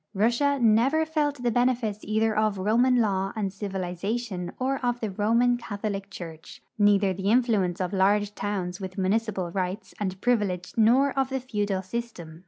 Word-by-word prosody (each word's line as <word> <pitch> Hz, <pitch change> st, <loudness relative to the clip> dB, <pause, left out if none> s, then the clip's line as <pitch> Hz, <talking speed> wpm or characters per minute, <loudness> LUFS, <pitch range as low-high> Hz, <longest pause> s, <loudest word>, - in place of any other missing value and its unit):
Russia 240 Hz, +8 st, +2 dB
never 245 Hz, +8 st, +3 dB
felt 295 Hz, -4 st, -1 dB
the 240 Hz, -, +2 dB
bene 245 Hz, +2 st, +3 dB
fits 215 Hz, -4 st, -4 dB
either 220 Hz, +1 st, 0 dB
of 215 Hz, -2 st, +1 dB
Roman 230 Hz, +6 st, +3 dB
law 195 Hz, -5 st, +1 dB
and 200 Hz, -3 st, -2 dB
civilization 195 Hz, 0 st, -4 dB
or 265 Hz, +1 st, -1 dB
of 245 Hz, 0 st, 0 dB
the 220 Hz, -4 st, -3 dB
Roman 230 Hz, +5 st, +2 dB
Cath 210 Hz, -4 st, -8 dB
olic 200 Hz, -2 st, -3 dB
church; 165 Hz, -4 st, -9 dB, 0.2 s
neither 200 Hz, -2 st, +4 dB
the 190 Hz, +2 st, -2 dB
influence 215 Hz, -7 st, +2 dB
of 185 Hz, +1 st, -2 dB
large 205 Hz, +2 st, +2 dB
towns 195 Hz, -3 st, -3 dB
with 185 Hz, 0 st, -6 dB
municipal 195 Hz, -2 st, 0 dB
rights 185 Hz, +3 st, -3 dB
and 190 Hz, -2 st, -3 dB
privileges 205 Hz, -7 st, 0 dB
nor 245 Hz, +5 st, +4 dB
of 270 Hz, -1 st, 0 dB
the 265 Hz, 0 st, -2 dB
feudal 205 Hz, -6 st, -2 dB
system. 185 Hz, -7 st, -6 dB
210 Hz, 170 wpm, -26 LUFS, 190-240 Hz, 0.2 s, neither